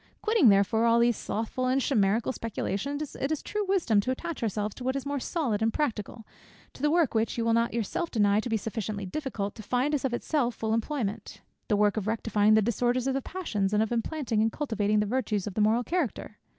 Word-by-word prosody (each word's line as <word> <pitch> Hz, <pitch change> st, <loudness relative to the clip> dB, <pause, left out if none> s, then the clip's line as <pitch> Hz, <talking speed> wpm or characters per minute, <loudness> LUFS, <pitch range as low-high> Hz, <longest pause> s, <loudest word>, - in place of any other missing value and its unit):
Quitting 430 Hz, -, +5 dB
therefore 200 Hz, +3 st, +3 dB
all 230 Hz, 0 st, +4 dB
these 235 Hz, 0 st, +3 dB
slothful 230 Hz, +6 st, -3 dB
and 260 Hz, +1 st, +2 dB
chimerical 225 Hz, -3 st, +1 dB
speculations, 260 Hz, +5 st, -3 dB
it 275 Hz, -, -2 dB
is 310 Hz, -, -2 dB
true 420 Hz, 0 st, -2 dB
wisdom 330 Hz, -, +2 dB
to 225 Hz, -, -4 dB
attach 325 Hz, +5 st, -3 dB
ourselves 210 Hz, -2 st, -1 dB
to 255 Hz, -, -9 dB
what 260 Hz, +1 st, -1 dB
is 275 Hz, -, -3 dB
more 285 Hz, 0 st, -2 dB
solid 250 Hz, -, -1 dB
and 225 Hz, 0 st, +2 dB
practical; 225 Hz, -5 st, -3 dB, 0.5 s
to -, -, -13 dB
the 295 Hz, -, +3 dB
work 330 Hz, -3 st, +2 dB
which 225 Hz, +1 st, 0 dB
you 230 Hz, -, 0 dB
will 230 Hz, -, +3 dB
not 230 Hz, +1 st, +2 dB
yourself 235 Hz, -, -2 dB
deny 205 Hz, -2 st, +3 dB
to 240 Hz, -, -3 dB
be 225 Hz, -, +1 dB
sufficiently 215 Hz, -1 st, -4 dB
difficult 205 Hz, -3 st, -4 dB
to 220 Hz, -, -10 dB
find 255 Hz, +7 st, 0 dB
us 290 Hz, -, 0 dB
of 265 Hz, -, 0 dB
itself 245 Hz, 0 st, 0 dB
full 220 Hz, 0 st, -2 dB
employment: 225 Hz, -4 st, -3 dB, 0.3 s
the 210 Hz, -, +2 dB
work 210 Hz, 0 st, +2 dB
of 210 Hz, -1 st, -2 dB
rectifying 215 Hz, -1 st, +2 dB
the 220 Hz, -, +4 dB
disorders 240 Hz, +3 st, 0 dB
of 270 Hz, -, +1 dB
the 270 Hz, -, -1 dB
passions, 215 Hz, -, -2 dB
and 210 Hz, -, +4 dB
of 220 Hz, -, -4 dB
implanting 235 Hz, -1 st, -1 dB
and 225 Hz, +1 st, +2 dB
cultivating 215 Hz, -7 st, 0 dB
the -, -, 0 dB
virtues 215 Hz, -3 st, -1 dB
of 210 Hz, -, -5 dB
the 215 Hz, -, 0 dB
moral 220 Hz, +3 st, +3 dB
character." 285 Hz, -, -3 dB
230 Hz, 225 wpm, -28 LUFS, 210-270 Hz, 0.5 s, Quitting